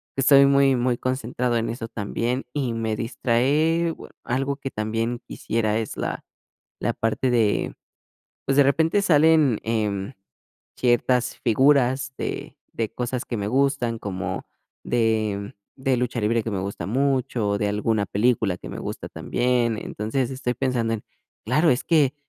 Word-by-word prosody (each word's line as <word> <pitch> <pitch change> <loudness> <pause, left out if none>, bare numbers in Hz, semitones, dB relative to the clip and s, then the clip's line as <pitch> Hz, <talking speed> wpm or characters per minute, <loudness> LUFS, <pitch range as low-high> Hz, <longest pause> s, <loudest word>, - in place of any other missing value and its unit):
estoy 135 +1 +6
muy 140 -1 +4
muy 125 0 +1
concentrado 125 -1 -1
en 115 - -1
eso 115 -1 -4
también. 115 +4 -2
Y, 130 -5 -1
me 110 -1 -1
distraé, 145 +8 +1 0.3
algo 135 +3 -1
que 135 -1 -6
también 115 +3 -2
quisiera 110 -1 -1
es 110 - -4
la - - -3 0.6
la - - 0
parte 115 +3 0
de, 110 -4 +1 0.7
pues, 135 - +1
de 145 - +8
repente 160 +8 +2
salen, 155 - +4
em, 105 -1 -1 0.6
ciertas 125 0 +2
figuras 130 +2 +3
de - - -5 0.2
de 115 -2 -1
cosas 125 0 -3
que 120 - -4
me 100 - -2
gustan, 125 -2 +1
como 95 -3 -4 0.4
de, 110 -4 0 0.2
mm, 130 - -16
de 130 -1 +2
lucha 125 0 -1
libre 110 +1 +1
que 115 - -3
me 100 - -1
gusta 95 -3 -4
mucho, 130 -3 0
o 100 - +1
de 105 - +1
alguna 105 0 0
película 105 -3 +1
que - - -10
me - - -6
gusta - - -5
también, 120 -2 0
entonces, 120 +4 -2
estoy 130 -2 -2
pensando 120 -3 0
en, 105 - -9 0.4
claro 150 +9 +3
es 125 - 0
que 150 -5 +3
120 Hz, 155 wpm, -24 LUFS, 110-135 Hz, 0.7 s, de